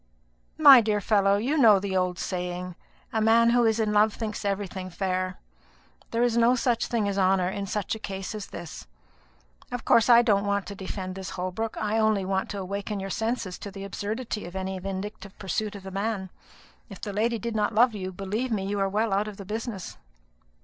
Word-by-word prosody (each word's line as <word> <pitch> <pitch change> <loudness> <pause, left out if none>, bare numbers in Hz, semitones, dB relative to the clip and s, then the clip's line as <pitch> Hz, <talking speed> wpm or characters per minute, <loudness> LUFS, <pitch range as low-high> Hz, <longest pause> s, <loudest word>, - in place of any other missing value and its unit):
"My 280 -5 +9
dear 210 -1 0
fellow, 200 -1 +3
you 270 +9 0
know 220 -6 +7
the 190 0 -3
old 180 -1 0
saying. 180 -1 -4 0.4
A 220 - +1
man 230 +1 +5
who 240 0 +4
is 225 0 +2
in 215 -1 +1
love 210 0 +4
thinks 215 -2 -4
everything 195 -2 -3
fair. 185 0 -2 0.7
There 235 +1 +1
is 240 -2 +2
no 235 +1 +4
such 240 -2 0
thing 225 -4 0
as 200 0 -1
honour 185 -1 +3
in 200 +1 -4
such 205 0 -2
a 220 - -5
case 195 -2 -5
as 210 -2 -6
this. 165 - -9 0.8
Of 245 0 -5
course, 230 +1 +4
I 240 0 +8
don't 205 -3 +2
want 200 -1 0
to 200 - -7
defend 190 -1 -5
this 190 0 -6
Holbrook; 185 +5 -4
I 215 +1 0
only 215 -3 +2
want 190 0 -1
to 205 - -5
awaken 200 +2 -4
your 195 0 -5
senses 225 -4 -2
to 205 - -7
the 195 0 -8
absurdity 210 +1 -4
of 175 - -11
any 190 0 -3
vindictive 195 +1 -6
pursuit 205 +2 -3
of 200 - -9
the 190 - -7
man. 195 -1 -3 0.6
If 195 - -10
the 205 - -5
lady 230 +3 +1
did 230 +1 -4
not 210 0 0
love 240 +1 +5
you, 190 -3 -5
believe 200 +7 -3
me 200 -3 -1
you 200 +1 -2
are 195 0 +1
well 210 +1 0
out 205 +2 +1
of 210 -2 -8
the 200 - -8
business." 215 -1 -5
205 Hz, 210 wpm, -26 LUFS, 190-220 Hz, 0.8 s, My